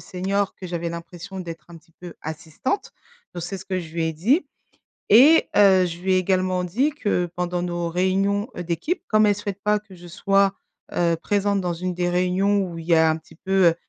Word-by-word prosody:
senior 195 +2 -2
que 185 - -9
j'avais 170 -1 -3
l'impression 175 +3 -8
d'être 165 -3 -8
un 170 - -11
petit 165 - -29
peu 175 -2 -9
assistante. 160 - -4 0.4
Donc 175 - -5
c'est 195 +3 -5
ce 195 - -11
que 190 -1 -1
je 160 -2 -10
lui 165 -1 -1
ai 160 - -1
dit 245 - +2 0.6
et 280 +10 +7
heu, 190 -2 +6
je 170 -1 -6
lui 190 +1 0
ai - - +4
également 185 0 +1
dit 240 - +1
que 205 -11 -1
pendant 180 0 -1
nos 175 -1 -2
réunions, 195 +4 +1
heu, 175 - -4
d'équipe, 175 - -2
comme 215 0 +4
elle 205 - +4
souhaite 200 -1 -6
pas 210 0 +3
que 205 -2 -16
je 175 0 -13
sois, 195 +2 +2 0.4
heu, 170 -1 +2
présente 200 +1 0
dans 175 -2 -2
une 180 +2 -3
des 175 0 -1
réunions 185 +3 +1
où 165 - -7
il 165 - -9
y 170 - +4
a 160 0 +5
un 155 - 0
petit 160 0 -15
peu, 190 +1 +2
heu 165 - +5
185 Hz, 220 wpm, -23 LUFS, 170-200 Hz, 0.6 s, et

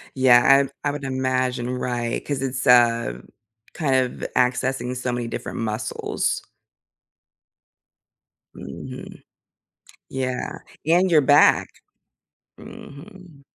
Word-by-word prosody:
Yeah, 130 +2 +6 0.2
I - - 0
I - - +1
would 145 -1 -7
imagine 130 -1 -1
right, 120 -2 -3
'cause 140 -2 -3
it's, 130 0 -3
uh, 115 - +4 0.5
kind 140 -5 0 0.3
of - - -2
accessing 125 0 0
so 125 0 -2
many 120 -1 -3
different - - -6
muscles. 110 0 -2 2.1
Mhm. 65 0 -9 0.9
Yeah, 130 -1 -3 0.3
and 175 +3 +3
your 155 -2 +6
back. 145 +1 +5 0.9
Mhm. 170 -1 -13
130 Hz, 95 wpm, -22 LUFS, 120-140 Hz, 2.1 s, Yeah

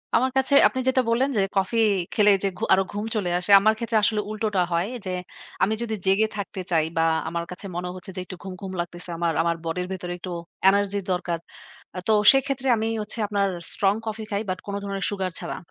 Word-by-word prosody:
আমার 260 +1 +3
কাছে 265 +1 +2
আপনি 260 - -4
যেটা 260 0 +4
বললেন 250 +4 +2
যে, 200 - +4 0.2
কফি 195 +4 +1 0.4
খেলে 210 -1 +5
যে, - - +2
ঘ - - -13
আরো 190 0 +4
ঘুম 205 +1 -3
চলে 195 -4 0
আসে, 180 +3 -1
আমার 215 +2 +4
ক্ষেত্রে 230 -1 0
আসলে 210 0 +2
উল্টোটা 215 -3 0
হয় 170 +3 +1 0.2
যে, 185 - -2 0.5
আমি 215 - +2
যদি 225 -2 -2
জেগে 195 +3 +4
থাকতে 200 -1 -5
চাই 160 -2 +3
বা 165 - +4 0.3
আমার 170 0 -3
কাছে 180 +3 -7
মনে 180 +1 -3
হচ্ছে 185 +1 -9
যে, - - -4
একটু 185 - -8
ঘুম, 190 -1 -6
ঘুম 195 -1 -5
লাগতেছে। 175 +1 -5
আমার, 170 -1 0
আমার 170 0 +1
বডির 180 +2 -2
ভেতরে 180 -2 -4
একটু 180 +1 -7 0.4
এনার্জি 200 0 +1
দরকার। 175 -2 -1 0.6
আ - - -1
তো 220 - +4 0.2
সেক্ষেত্রে 270 -1 0
আমি 220 +1 -1
হচ্ছে 210 +2 -6
আপনার 200 -1 +1 0.3
স্ট্রং 195 -1 +2
কফি 220 0 -4
খাই। 200 0 0
বাট 185 - -1
কোন 200 - -5
ধরনের 195 -1 -3
সুগার 190 -2 -2
ছাড়া। - - -5
200 Hz, 215 wpm, -24 LUFS, 180-220 Hz, 0.6 s, খেলে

